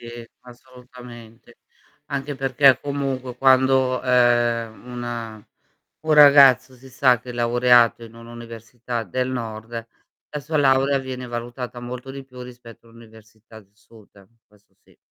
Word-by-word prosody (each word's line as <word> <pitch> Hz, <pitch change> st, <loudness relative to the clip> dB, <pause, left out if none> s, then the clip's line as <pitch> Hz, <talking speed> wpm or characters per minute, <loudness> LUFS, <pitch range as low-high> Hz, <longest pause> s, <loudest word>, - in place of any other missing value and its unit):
Sì, 120 Hz, 0 st, -11 dB
assolutamente. 125 Hz, -2 st, -15 dB, 0.5 s
Anche 140 Hz, 0 st, -4 dB
perché 135 Hz, 0 st, +3 dB
comunque 135 Hz, -3 st, -4 dB
quando, 130 Hz, 0 st, +2 dB
ehm, 120 Hz, -2 st, +1 dB
una 115 Hz, -3 st, -7 dB, 0.6 s
un 155 Hz, 0 st, -1 dB
ragazzo 140 Hz, -3 st, +6 dB
si 130 Hz, +2 st, -16 dB
sa 125 Hz, -1 st, +2 dB
che 125 Hz, -, -12 dB
è -, -, -6 dB
laureato 120 Hz, -1 st, +2 dB
in 115 Hz, -, -15 dB
un'università 115 Hz, 0 st, -8 dB
del 125 Hz, +6 st, -3 dB
nord, 115 Hz, -2 st, -6 dB, 0.6 s
la 150 Hz, -, -5 dB
sua 155 Hz, +2 st, -4 dB
laurea 135 Hz, 0 st, +2 dB
viene 130 Hz, -1 st, -7 dB
valutata 120 Hz, +1 st, -7 dB
molto 125 Hz, +2 st, -8 dB
di 135 Hz, -1 st, -9 dB
più 125 Hz, -1 st, -14 dB
rispetto 120 Hz, -2 st, -14 dB
a 115 Hz, -, -19 dB
un'università 110 Hz, -1 st, -17 dB
del 100 Hz, -1 st, -27 dB
sud. 105 Hz, -3 st, -21 dB, 0.2 s
Questo 105 Hz, -1 st, -29 dB
sì, -, -, -26 dB
125 Hz, 135 wpm, -21 LUFS, 115-130 Hz, 0.6 s, ragazzo